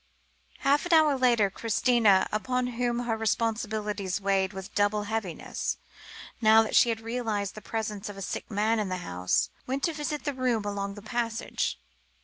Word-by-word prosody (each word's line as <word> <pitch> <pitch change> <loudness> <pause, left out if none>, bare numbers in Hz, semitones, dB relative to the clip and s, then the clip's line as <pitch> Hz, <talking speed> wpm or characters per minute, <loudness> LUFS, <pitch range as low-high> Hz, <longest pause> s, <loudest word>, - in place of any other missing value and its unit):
Half 285 +5 +2
an 350 - +1
hour 310 -3 +6
later, 240 -6 +3
Christina, 225 -2 +3
upon 250 +4 0
whom 240 0 -1
her 235 -2 -1
responsibilities 215 -3 -1
weighed 195 -1 +1
with 190 -2 -8
double 205 +1 +2
heaviness, 205 -5 -3 0.6
now 220 0 +7
that 220 - -3
she 240 - +6
had 225 -1 -2
realised 225 -4 -2
the 215 - -9
presence 215 -1 -4
of 205 - -7
the 195 - -6
sick - - -5
man 215 +2 +1
in 205 -3 -1
the 185 - -2
house, 90 +1 0 0.2
went 270 +2 -2
to 330 - +1
visit 300 0 -3
the 290 - -1
room 250 -5 0
along 200 -1 -3
the 205 - -10
passage. 230 0 -2
220 Hz, 170 wpm, -28 LUFS, 205-245 Hz, 0.6 s, now